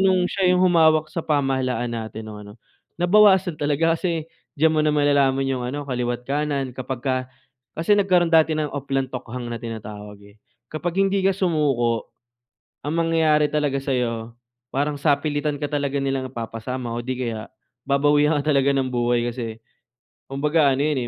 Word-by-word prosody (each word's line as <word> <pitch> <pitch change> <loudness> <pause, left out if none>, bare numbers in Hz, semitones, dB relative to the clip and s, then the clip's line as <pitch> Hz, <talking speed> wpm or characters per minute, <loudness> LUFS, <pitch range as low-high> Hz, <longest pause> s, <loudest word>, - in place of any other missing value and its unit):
nung 185 -1 +3
siya 190 -2 +1
yung 180 0 +3
humawak 160 -3 +4
sa 165 - -2
pamahalaan 130 -5 0
natin 110 -1 -6
nung 105 -1 -8
ano, 105 - -11 0.5
nabawasan 190 -3 +4
talaga 150 +3 +2
kasi 165 -3 -2 0.3
diyan 160 +2 +3
mo 155 - +2
na 155 - +2
malalaman 140 -2 +2
'yong 130 -2 -2
ano, 145 +2 -4
kaliwa't 125 -2 -3
kanan 140 -2 -2
kapagka 130 0 -3 0.5
kasi 165 +6 +1
nagkaroon 180 -4 +2
dati 160 -1 +4
ng 150 -1 -2
Oplan 135 -1 -2
Tokhang 125 -1 -6
na 115 - -5
tinatawag, 105 -3 -8
eh. 100 +1 -18 0.4
Kapag 170 +3 -3
hindi 195 0 +1
ka 195 - +4
sumuko, 140 - 0 0.8
ang 155 - -1
mangyayari 155 -2 +3
talaga 145 -2 0
sa'yo, 120 -4 -2 0.4
parang 145 +2 -1
sapilitan 145 0 0
ka 145 - -2
talaga 140 -1 -1
nilang 135 -1 -2
ipapasama 120 +1 -5
o 120 - -4
'di 130 +1 -3
kaya 110 -1 -6 0.4
babawian 145 +2 +3
ka 150 - -2
talaga 140 0 +3
ng 135 -1 0
buhay 120 -1 0
kasi 115 -2 -6 0.7
kumbaga 145 +1 +2
ano 135 - -1
'yon, 145 -4 0
140 Hz, 160 wpm, -23 LUFS, 125-155 Hz, 0.8 s, humawak